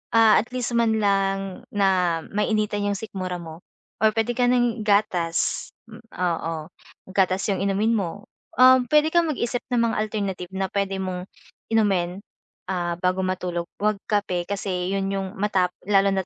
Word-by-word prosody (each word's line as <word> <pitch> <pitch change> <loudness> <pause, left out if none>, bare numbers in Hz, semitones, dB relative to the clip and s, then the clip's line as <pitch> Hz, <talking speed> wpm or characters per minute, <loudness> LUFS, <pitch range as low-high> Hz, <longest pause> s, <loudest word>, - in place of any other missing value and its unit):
ah, 225 -1 +7
at 225 - -3
least 250 -1 -2
man 230 -1 +3
lang 195 -2 0
na 185 -4 +2
mainitan 210 0 0
'yong 205 0 0
sikmura 185 -4 -5
mo 165 -1 -9 0.4
or 220 0 +4
puwede 230 +2 0
ka 250 - +1
ng 240 -2 +2
gatas 180 -5 +1 0.2
m 220 - -11 0.2
oo, 165 -2 -1 0.6
gatas 190 0 +2
'yong 195 - -1
inumin 200 +3 +1
mo. 200 0 -3 0.3
Um, 255 -1 +6
puwede 300 +3 +4
kang 340 0 +3
mag-isip 245 -4 -1
ng 240 -1 +3
mga - - -3
alternative 195 -4 -4
na 190 0 0
puwede 195 -1 -1
mong 185 -1 -4 0.4
inumin, 195 -4 +1 0.5
ah, 175 -2 -1
bago 185 +1 +1
matulog 180 -2 -2
'wag 210 0 +2
kape 200 -5 0
kasi 190 -2 -2
'yon 195 0 -1
'yong 195 -1 -2
matap 195 -3 +2 0.2
lalo 195 -1 +4
na't 190 -1 -1
195 Hz, 160 wpm, -24 LUFS, 185-215 Hz, 0.6 s, ah